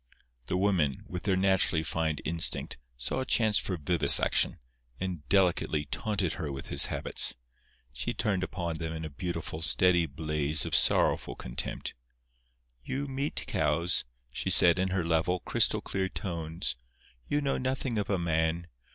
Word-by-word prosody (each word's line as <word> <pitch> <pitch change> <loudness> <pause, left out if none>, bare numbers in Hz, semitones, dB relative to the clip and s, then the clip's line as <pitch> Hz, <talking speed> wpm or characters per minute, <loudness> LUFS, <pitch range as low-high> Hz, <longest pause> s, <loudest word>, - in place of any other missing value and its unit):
The 90 - -1
women, 90 -9 0
with 90 +1 -7
their 95 -2 +2
naturally 95 -4 +2
fine 80 -1 -1
instinct, 80 -5 +2 0.2
saw 60 - -3
a - - -1
chance 110 -3 +3
for 95 - -3
vivisection, 75 -1 +5 0.4
and 90 -6 -5
delicately 90 -5 +2
taunted 100 -3 -2
her 80 -4 -5
with 70 0 -7
his - - +2
habits. - - +2 0.6
She 65 +2 -2
turned 105 -5 -1
upon 85 -3 -4
them 80 -1 -4
in 80 0 -6
a 75 - -7
beautiful, 80 0 -5
steady 85 +2 +3
blaze 75 -1 -1
of - - -5
sorrowful - - +2
contempt. - - -5 0.9
"You 140 - -4
meat 135 +2 -3
cows," 85 +3 +1 0.3
she - - -3
said, 85 0 +6
in 95 - +1
her 95 -2 -1
level, 85 +2 0
crystal - - +2
clear 95 -1 -3
tones; 85 -7 -3 0.5
"you 145 - 0
know 140 -2 -1
nothing 130 -3 -2
of 105 - -3
a 100 - +1
man. 85 0 -1
85 Hz, 150 wpm, -29 LUFS, 80-95 Hz, 0.9 s, said